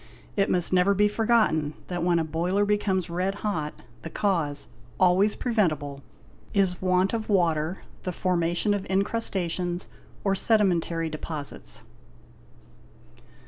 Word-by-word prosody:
It 195 -1 +2
must 180 0 +5
never 185 +2 +4
be 210 +2 +4
forgotten 210 -9 +1
that, 175 -1 -4
when 175 -1 +3
a 165 - +1
boiler 175 +6 0
becomes 200 -3 0
red 185 +3 -1
hot, 155 -8 -2 0.3
the - - -7
cause—always 180 - 0
preventible—is 180 - -2
want 185 +2 +2
of 225 -1 -3
water, 170 -3 +1 0.2
the 180 - -3
formation 175 +3 0
of 205 - -1
incrusta 195 -1 +1
tions, 175 +1 -2 0.3
or 195 - +2
sedimentary 175 -6 +2
deposits. 155 -1 -4
180 Hz, 115 wpm, -26 LUFS, 165-200 Hz, 0.3 s, must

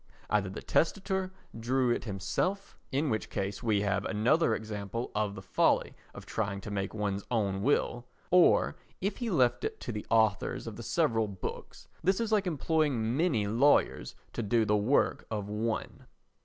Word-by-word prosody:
Either 105 -2 +2
the 95 - -7
testator 190 +2 0 0.3
drew 125 +2 +1
it 120 - -1
himself, 115 - -2 0.2
in 140 +1 +1
which 110 - -2
case 100 0 -3
we 110 -4 +2
have 100 -1 0
another 115 +4 +2
example 110 +1 -5
of 105 -1 -1
the 95 - -8
folly 95 - +2 0.2
of - - -9
trying 100 -3 -2
to 105 - -7
make 100 -1 -2
one's 100 -2 -2
own 100 -5 0
will, 120 -1 +1 0.2
or 180 -1 +5 0.2
if 200 +3 -2
he 240 -2 -2
left 125 - +2
it - - -3
to - - -5
the 105 -2 -6
authors 110 -3 +2
of - - -6
the - - -8
several 110 -1 +1
books—this 105 - -4
is 230 -1 -1
like 205 -3 +2
employing 145 -7 +1
many 145 - +2
lawyers 120 +8 +2 0.2
to - - -2
do 115 +1 +2
the 105 0 +2
work 105 +7 +1
of 105 -2 -3
one. 110 +2 -3
110 Hz, 170 wpm, -30 LUFS, 105-145 Hz, 0.3 s, or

